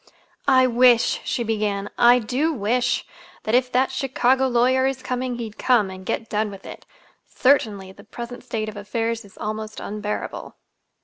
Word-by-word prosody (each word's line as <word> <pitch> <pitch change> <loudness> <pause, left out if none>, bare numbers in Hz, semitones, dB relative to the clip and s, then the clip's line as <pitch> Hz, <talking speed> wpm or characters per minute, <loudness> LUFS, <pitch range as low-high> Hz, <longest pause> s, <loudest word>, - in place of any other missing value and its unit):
"I 260 -2 +6
wish," 245 -1 +4
she 240 - -2
began, 210 -3 -1
"I 240 +1 +6
do 255 +7 0
wish 245 -1 0 0.4
that 215 - -2
if 250 0 +3
that 260 +2 +2
Chicago 265 -1 +1
lawyer 255 +2 +3
is 265 -1 -3
coming, 255 0 -2
he'd 225 -3 -7
come, 225 -7 +3
and 190 0 -9
get 230 - -2
done 210 0 -1
with 195 -1 -11
it! - - -10 0.4
Certainly 215 -8 +1
the - - -15
present 240 +1 -8
state 215 -1 -3
of 215 - -7
affairs 225 +3 -3
is 200 - -18
almost 215 0 -5
unbearable." 210 0 -5
235 Hz, 165 wpm, -23 LUFS, 215-255 Hz, 0.4 s, I